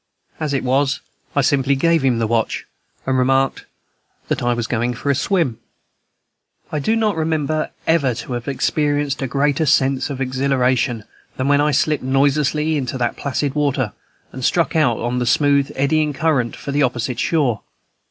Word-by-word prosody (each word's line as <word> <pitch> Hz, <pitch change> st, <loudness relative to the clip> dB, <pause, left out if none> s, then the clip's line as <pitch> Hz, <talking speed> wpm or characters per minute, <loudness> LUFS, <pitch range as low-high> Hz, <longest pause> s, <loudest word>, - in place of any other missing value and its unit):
As 155 Hz, -2 st, -2 dB
it 135 Hz, -, -1 dB
was, 135 Hz, +2 st, +1 dB, 0.4 s
I 140 Hz, -, +4 dB
simply 140 Hz, 0 st, +2 dB
gave 165 Hz, +3 st, +2 dB
him 130 Hz, -3 st, +2 dB
the 115 Hz, -, 0 dB
watch, 115 Hz, 0 st, -1 dB, 0.4 s
and 130 Hz, -, 0 dB
remarked 135 Hz, +1 st, +1 dB, 0.6 s
that -, -, -1 dB
I 120 Hz, 0 st, +1 dB
was 120 Hz, -1 st, -2 dB
going 120 Hz, +1 st, -1 dB
to -, -, -10 dB
take -, -, -13 dB
a 140 Hz, -, +3 dB
swim. 155 Hz, -, 0 dB, 1.1 s
I 150 Hz, -, -1 dB
do 220 Hz, +11 st, +1 dB
not 220 Hz, -3 st, +1 dB
remember 155 Hz, -1 st, -1 dB, 0.2 s
ever 145 Hz, -7 st, +2 dB
to 125 Hz, -, -6 dB
have 120 Hz, +1 st, -5 dB
experienced 145 Hz, 0 st, 0 dB
a 135 Hz, -, -1 dB
greater 145 Hz, +3 st, +1 dB
sense 135 Hz, -1 st, +2 dB
of 135 Hz, -2 st, -5 dB
exhilaration 130 Hz, -3 st, 0 dB, 0.3 s
than 130 Hz, -, -1 dB
when 145 Hz, 0 st, +4 dB
I 150 Hz, -, +2 dB
slipped 150 Hz, 0 st, +1 dB
noiselessly 145 Hz, +3 st, +1 dB
into 130 Hz, -2 st, -3 dB
the 120 Hz, -1 st, +1 dB
placid 140 Hz, 0 st, -2 dB
water, 140 Hz, -6 st, 0 dB, 0.4 s
and 130 Hz, -, -8 dB
struck 170 Hz, +5 st, +1 dB
out 140 Hz, -8 st, +2 dB
into 125 Hz, +1 st, -1 dB
the 125 Hz, -, -1 dB
smooth, 140 Hz, +1 st, +3 dB
eddying 150 Hz, +2 st, +1 dB
current 135 Hz, -6 st, 0 dB
for 140 Hz, -, -6 dB
the 145 Hz, +1 st, +1 dB
opposite 125 Hz, -1 st, -1 dB
shore. 135 Hz, -10 st, +1 dB
140 Hz, 175 wpm, -20 LUFS, 125-150 Hz, 1.1 s, I